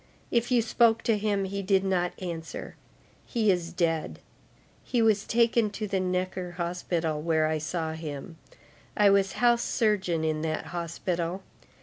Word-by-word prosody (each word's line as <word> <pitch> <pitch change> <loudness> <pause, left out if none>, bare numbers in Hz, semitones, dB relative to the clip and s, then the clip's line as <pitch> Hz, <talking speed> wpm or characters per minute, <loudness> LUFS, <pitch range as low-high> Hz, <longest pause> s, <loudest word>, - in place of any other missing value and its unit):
If 235 0 +1
you 245 -3 +3
spoke 230 0 +3
to 225 - +3
him, 205 -2 0
he 200 +1 -3
did 195 0 +2
not 180 -2 0
answer. 170 -3 -6 0.5
He 220 -4 +2
is 175 -2 -1
dead. 165 -2 -1 0.7
He 245 - -1
was 215 -3 +3
taken 235 -1 +3
to 215 +1 -4
the 195 -1 0
Necker 185 -1 -2
Hospital, 170 -3 -2
where 160 -1 +2
I 155 0 0
saw 160 0 -3
him. 160 +1 -7 0.6
I 205 -1 +6
was 195 -1 +3
house 240 -1 +3
surgeon 190 -10 +1
in 155 -1 0
that 155 0 -2
hospital. 170 +1 -3
185 Hz, 150 wpm, -28 LUFS, 165-210 Hz, 0.7 s, I